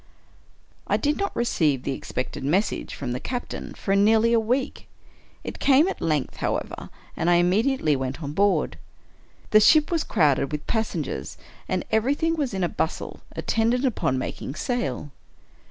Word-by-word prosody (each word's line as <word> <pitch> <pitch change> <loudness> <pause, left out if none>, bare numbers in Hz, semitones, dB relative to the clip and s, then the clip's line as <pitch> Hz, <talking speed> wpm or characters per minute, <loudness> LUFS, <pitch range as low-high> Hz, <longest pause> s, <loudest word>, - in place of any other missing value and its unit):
I - - +2
did 295 0 0
not 400 - -2
receive 155 - +1
the - - -2
expected 130 -1 -4
message 185 +10 0
from 125 -3 -4
the 125 - -2
captain 245 - -5
for 195 - 0
nearly 220 +3 +4
a 230 - +5
week. 250 +5 -2 0.6
It - - -7
came 285 +5 +5
at 390 - -4
length, 150 -5 -1
however, - - -3 0.3
and 170 - 0
I 175 - +5
im 175 +1 +3
mediately 220 - +2
went 130 +1 -3
on 145 0 -4
board. 200 +4 +1 0.7
The 215 - +8
ship 305 +9 +5
was 330 -3 +1
crowded 145 -7 +2
with 150 -1 -4
pas 220 -1 -1
sengers, - - -4 0.3
and - - -1
everything 280 +9 +2
was 290 -5 -1
in 190 -2 -2
a - - +3
bustle 160 - -3 0.2
attendant 235 +4 +1
upon 170 - 0
making 130 +1 -5
sail. 150 - -2
210 Hz, 165 wpm, -25 LUFS, 150-250 Hz, 0.7 s, The